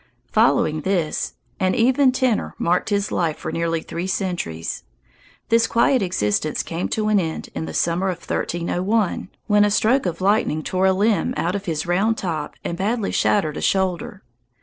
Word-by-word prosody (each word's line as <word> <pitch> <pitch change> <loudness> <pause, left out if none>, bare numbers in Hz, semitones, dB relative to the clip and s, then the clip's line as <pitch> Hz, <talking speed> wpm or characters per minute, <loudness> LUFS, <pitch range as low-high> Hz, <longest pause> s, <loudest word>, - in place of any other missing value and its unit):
Following 155 0 +3
this, 175 -3 -1 0.2
an 185 -1 +1
even 260 +3 +4
tenor 255 -4 0
marked 175 +4 +1
his 200 -1 0
life 165 -3 0
for - - -5
nearly 165 -1 -1
three 175 +2 -4
centuries. 175 - -3 0.7
This 230 0 +4
quiet 240 +2 +3
existence 150 - 0
came 170 +2 -3
to 215 -1 -1
an 210 -1 +4
end 160 -3 -4
in - - -4
the - - -7
summer 175 +3 +1
of 180 - -2
1301, 185 +4 -1 0.2
when 210 -1 +4
a 210 - +3
stroke 220 +3 +2
of 170 -1 -3
lightning 190 -5 +1
tore 185 +4 +1
a - - +5
limb 210 +5 +1
out 175 - 0
of 200 0 -4
his 160 -3 -2
round 195 +6 +1
top 160 -5 -3
and 170 - -4
badly 215 +2 0
shattered 155 -8 +1
a - - -4
shoulder. 190 0 -1
190 Hz, 170 wpm, -22 LUFS, 170-210 Hz, 0.7 s, a